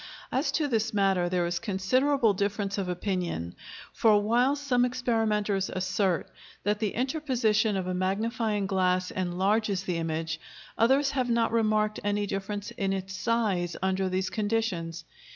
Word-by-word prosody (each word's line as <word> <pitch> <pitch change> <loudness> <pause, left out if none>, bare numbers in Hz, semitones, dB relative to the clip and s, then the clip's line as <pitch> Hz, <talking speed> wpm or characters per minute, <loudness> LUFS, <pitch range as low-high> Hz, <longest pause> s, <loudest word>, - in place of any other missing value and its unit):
As 270 +4 +1
to 305 -2 +1
this 225 -4 0
matter 190 -3 +2
there 180 -1 +1
is 175 0 -1
considerable 230 +5 +2
difference 200 0 -1
of 185 -2 -2
opinion, 180 - -2 0.4
for, 215 -2 +4
while 240 +6 +2
some 275 -4 +1
experimenters 220 -5 0
assert 185 0 0 0.4
that 205 +1 0
the 210 -3 -1
interposition 240 -6 +1
of 185 - -2
a 185 - -2
magnifying 205 +3 0
glass 185 -1 +1
enlarges 190 +2 0
the 180 -3 -2
image, 165 -1 -2 0.4
others 270 +5 +3
have 255 -3 -1
not 230 -1 +2
remarked 215 -2 +1
any 205 0 0
difference 200 +1 -4
in 195 -1 -1
its 190 0 -4
size 200 -7 0
under 190 0 +1
these 185 0 -1
conditions. 205 -7 -1
205 Hz, 145 wpm, -28 LUFS, 185-230 Hz, 0.4 s, for